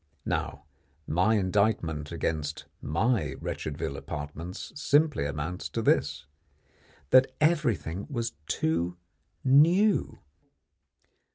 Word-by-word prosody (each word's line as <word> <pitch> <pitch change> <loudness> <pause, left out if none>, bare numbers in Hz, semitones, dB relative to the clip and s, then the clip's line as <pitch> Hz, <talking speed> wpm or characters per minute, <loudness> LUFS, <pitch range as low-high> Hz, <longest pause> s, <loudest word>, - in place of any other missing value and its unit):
Now 70 - -2 0.4
my 90 +7 +2
indictment 95 -6 0
against 80 -2 -2 0.2
my 85 - 0
Wretchedville 75 -2 -4
apartments 80 +6 -6
simply 145 - +2
amounts 80 +4 -4
to - - -3
this: - - +1 0.9
that 130 0 +6
everything 125 - +1
was 120 -4 -2
too 85 +2 0 0.5
new. 170 +10 +4
90 Hz, 85 wpm, -28 LUFS, 80-130 Hz, 0.9 s, that